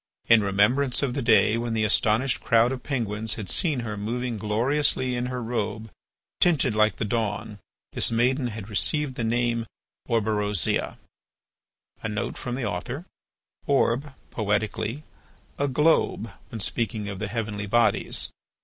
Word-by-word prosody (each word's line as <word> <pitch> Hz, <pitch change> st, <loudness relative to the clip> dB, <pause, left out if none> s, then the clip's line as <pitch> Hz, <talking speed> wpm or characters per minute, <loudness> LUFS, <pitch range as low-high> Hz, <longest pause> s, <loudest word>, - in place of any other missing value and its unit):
In 115 Hz, -2 st, +7 dB
remembrance 120 Hz, +8 st, +2 dB
of 130 Hz, -3 st, 0 dB
the 140 Hz, -, -2 dB
day 110 Hz, -1 st, +4 dB
when 120 Hz, -1 st, -2 dB
the 110 Hz, -, +1 dB
astonished 110 Hz, +4 st, +2 dB
crowd 115 Hz, +1 st, +4 dB
of 130 Hz, -1 st, -4 dB
Penguins 110 Hz, -5 st, -1 dB
had 105 Hz, -4 st, -6 dB
seen 150 Hz, -, +1 dB
her 110 Hz, -2 st, -4 dB
moving 120 Hz, +4 st, -3 dB
gloriously 125 Hz, +5 st, +1 dB
in 120 Hz, +1 st, -2 dB
her 125 Hz, -1 st, -4 dB
robe 110 Hz, -2 st, -3 dB, 0.5 s
tinted 160 Hz, -10 st, +3 dB
like 110 Hz, -1 st, +3 dB
the -, -, -2 dB
dawn, 105 Hz, -1 st, -2 dB, 0.3 s
this -, -, +2 dB
maiden 125 Hz, +3 st, +1 dB
had 110 Hz, -3 st, -6 dB
received 135 Hz, -, +1 dB
the 120 Hz, -, -4 dB
name 115 Hz, 0 st, 0 dB, 0.4 s
of 115 Hz, -2 st, +2 dB
Orberosia. 105 Hz, -4 st, 0 dB, 2.7 s
"Orb, 140 Hz, 0 st, +1 dB, 0.2 s
poetically, 110 Hz, +5 st, -1 dB, 0.6 s
a 145 Hz, -, +2 dB
globe 145 Hz, -5 st, +2 dB, 0.2 s
when 115 Hz, -, -6 dB
speaking 110 Hz, 0 st, -1 dB
of 100 Hz, -2 st, -5 dB
the 110 Hz, -, -2 dB
heavenly 105 Hz, -2 st, -3 dB
bodies. 115 Hz, +2 st, +1 dB
115 Hz, 130 wpm, -25 LUFS, 105-125 Hz, 2.7 s, In